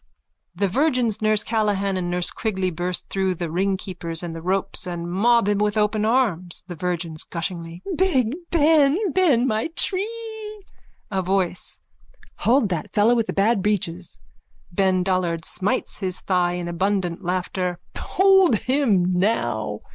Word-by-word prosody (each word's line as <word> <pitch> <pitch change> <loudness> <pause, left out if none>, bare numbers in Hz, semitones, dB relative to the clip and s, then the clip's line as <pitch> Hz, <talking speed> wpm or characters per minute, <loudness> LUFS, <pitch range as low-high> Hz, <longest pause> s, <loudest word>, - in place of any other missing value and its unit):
(The 200 +3 +1
virgins 250 - +1
Nurse 215 -1 +2
Callan 205 -3 0
and 180 -1 -2
Nurse 175 0 +1
Quigley 190 -4 -2
burst 175 +2 -2
through 190 -1 0
the 170 -2 -4
ringkeepers 180 -2 -2
and 165 -1 -5
the 165 - -6
ropes 185 +1 -1
and 175 -1 -4
mob 230 +3 +3
him 205 -1 +1
with 210 +1 +1
open 210 0 +1
arms.) 210 -8 0
THE 180 - -7
VIRGINS: 170 -2 -3
(Gushingly.) 170 0 -5
Big 285 -9 +1
Ben! 300 -2 +4
Ben 290 -9 +3
my 220 0 0
Chree! 385 +1 0 1.0
A 190 -1 0
VOICE: 185 -1 -2 0.6
Hold 240 -3 +3
that 175 -4 -3
fellow 215 +3 +4
with 230 -2 +1
the - - -3
bad 205 +1 +2
breeches. 185 -4 -2 0.5
BEN 185 0 +2
DOLLARD: 180 -3 0
(Smites 195 +2 -2
his 185 -3 -1
thigh 180 -2 +1
in 175 -1 -4
abundant 185 0 -1
laughter.) 180 0 -2 0.2
Hold 385 - +4
him 240 -6 +2
now. 110 - -1
190 Hz, 145 wpm, -23 LUFS, 175-220 Hz, 1.0 s, Ben